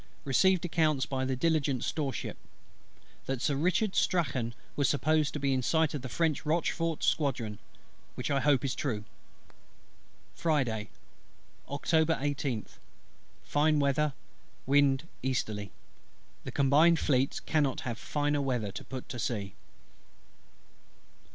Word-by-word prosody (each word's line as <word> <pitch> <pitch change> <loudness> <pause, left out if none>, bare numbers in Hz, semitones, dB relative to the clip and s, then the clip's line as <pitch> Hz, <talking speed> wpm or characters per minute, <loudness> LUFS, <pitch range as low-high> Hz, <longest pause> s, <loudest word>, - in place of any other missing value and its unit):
Received 180 +6 +3
accounts 155 -5 +2
by 130 -1 -2
the 130 0 0
Diligent 140 -3 +1
storeship, 140 -5 -3 0.9
that 135 -2 -1
Sir 140 +3 0
RICHARD 185 +7 +1
STRACHAN 130 -10 +1 0.2
was 145 - +2
supposed 155 +1 +1
in 135 -3 +1
sight 160 +4 +2
of 145 - -3
the 130 - -6
French 160 +3 0
Rochefort 165 +1 0
squadron; 120 -8 0 0.6
which 125 +3 -3
I 140 - +3
hope 140 -2 +3
is 135 - 0
true. 110 -7 -2 1.3
Friday, 125 -10 0 0.8
Oct. 140 +1 -6 0.2
18th. 140 -6 -2 0.6
Fine 150 +1 +2
weather: 140 +1 +2 0.5
wind 140 +2 +3
easterly. 110 -6 -2 0.7
The - - -4
Combined 150 +5 +5
Fleets 135 -3 +1
cannot 145 -4 0
have 120 -3 -4
finer 145 -1 0
weather 125 -7 -1
to - - -7
put 130 -1 -7
to 125 - -5
sea. 105 -5 -2
140 Hz, 120 wpm, -30 LUFS, 130-155 Hz, 1.3 s, Combined